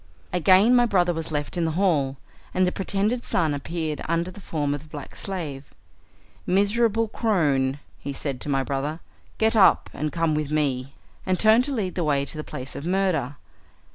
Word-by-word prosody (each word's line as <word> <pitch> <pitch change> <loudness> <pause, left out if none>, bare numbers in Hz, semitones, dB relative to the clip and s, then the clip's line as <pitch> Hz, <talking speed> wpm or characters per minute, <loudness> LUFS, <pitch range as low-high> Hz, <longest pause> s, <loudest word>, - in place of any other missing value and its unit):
Again 190 +7 +5
my 245 -1 +5
brother 180 -4 +2
was 165 0 -4
left 145 +3 -3
in 170 - +1
the 160 - -1
hall, 145 -9 +1 0.4
and 185 0 +4
the 180 - +1
pretended 205 +6 -1
son 160 -4 +1
appeared 155 +1 -3
under 170 +2 0
the 200 - -12
form 145 -5 -1
of 145 - -4
the 155 - -17
black 145 -3 -9
slave. 155 -8 -5 0.7
"Miserable 220 +4 +2
crone," 145 - +1 0.2
he 140 - -5
said 135 -1 -4
to - - -4
my 135 -1 +1
brother, 140 +4 -3 0.4
"get 220 +1 +2
up 205 - +5
and 150 +1 -3
come 165 -2 0
with 150 -1 -1
me," 140 -3 -1 0.3
and 185 -1 0
turned 220 +3 +5
to 285 - -3
lead 195 -6 -2
the 175 - -1
way 140 -2 +1
to 140 - -5
the 155 - -4
place 130 -2 -7
of - - -6
murder. 175 -7 0
165 Hz, 190 wpm, -24 LUFS, 145-195 Hz, 0.7 s, Again